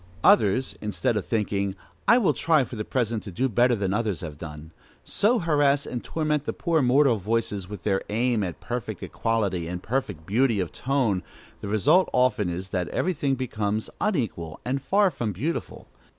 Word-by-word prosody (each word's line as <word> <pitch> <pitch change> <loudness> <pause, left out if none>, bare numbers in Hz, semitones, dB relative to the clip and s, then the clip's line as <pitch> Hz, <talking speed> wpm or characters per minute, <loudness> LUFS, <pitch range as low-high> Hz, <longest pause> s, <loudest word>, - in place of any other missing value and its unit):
Others, 115 +4 +4
instead 105 +2 0
of 105 - -2
thinking, 100 -3 -1 0.3
"I 235 - +7
will 230 -7 +3
try 160 -4 +3
for 125 - -7
the 105 - -3
present 115 -2 -1
to 100 - -8
do 125 +10 0
better 120 +1 +3
than 100 -3 -1
others 105 -6 -1
have 75 -3 -7
done," 75 0 -8 0.3
so 220 +5 +2
harass 145 -5 +2
and 120 - -5
torment 150 -2 -1
the - - -2
poor 165 -3 +1
mortal 130 -1 +4
voices 105 -2 -2
with 105 -3 -8
their 95 -2 +1
aim 115 +1 +1
at 90 -3 -4
perfect 120 -2 -5
equality 100 -7 -1
and 90 +1 -5
perfect 105 - -2
beauty 115 +2 +2
of 90 -3 -2
tone, 125 -8 0 0.4
the - - -6
result 145 - +3
often 120 -7 +2
is 90 +2 -5
that 90 -2 -1
every 185 - 0
thing 140 -3 0
becomes 110 -4 -2
unequal 110 - -1
and 135 +2 -1
far 200 +5 +3
from 120 -7 -3
beautiful. 145 - -4
115 Hz, 180 wpm, -25 LUFS, 100-135 Hz, 0.4 s, I